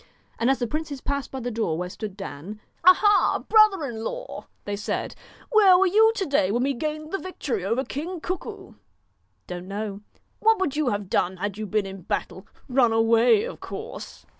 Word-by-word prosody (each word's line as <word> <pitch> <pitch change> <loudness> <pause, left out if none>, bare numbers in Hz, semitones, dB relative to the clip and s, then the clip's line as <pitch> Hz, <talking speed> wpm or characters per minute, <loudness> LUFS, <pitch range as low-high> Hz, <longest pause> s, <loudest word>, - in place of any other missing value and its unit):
And 235 - +2
as 270 - +3
the 245 - -1
princes 300 +2 -4
passed 280 +1 -3
by 265 - -6
the 245 +1 -3
door 215 -8 -1
where 180 +1 -3
stood 200 +1 -7
Dan, 195 +2 -7 0.2
'Ah, 370 +1 +9
ha! 415 0 +3
brother 430 -7 +5
in 225 -4 -5
law,' - - -6 0.2
they 205 - -2
said, 205 +2 -3 0.4
'where 400 -5 +7
were 385 - +4
you 435 +4 +5
to 390 - -1
day 275 - +2
when 240 +4 +1
we 275 +1 +1
gained 305 +4 -4
the 390 - -1
victory 265 - -4
over 230 +7 0
King 335 +6 -5
Cuckoo?' 365 +3 -6 0.4
' - - -45
Don't 180 0 -7
know.' 200 0 -5 0.4
'What 445 0 +4
would 305 -7 -1
you 300 -4 +1
have 205 -2 -2
done 185 +1 0
had 205 +2 -4
you 215 - -4
been 210 0 0
in 195 -1 -8
battle? - - -4 0.2
Run 250 -3 +3
away, 230 - +4
of - - -6
course.' - - -8
250 Hz, 200 wpm, -25 LUFS, -, 0.4 s, Ah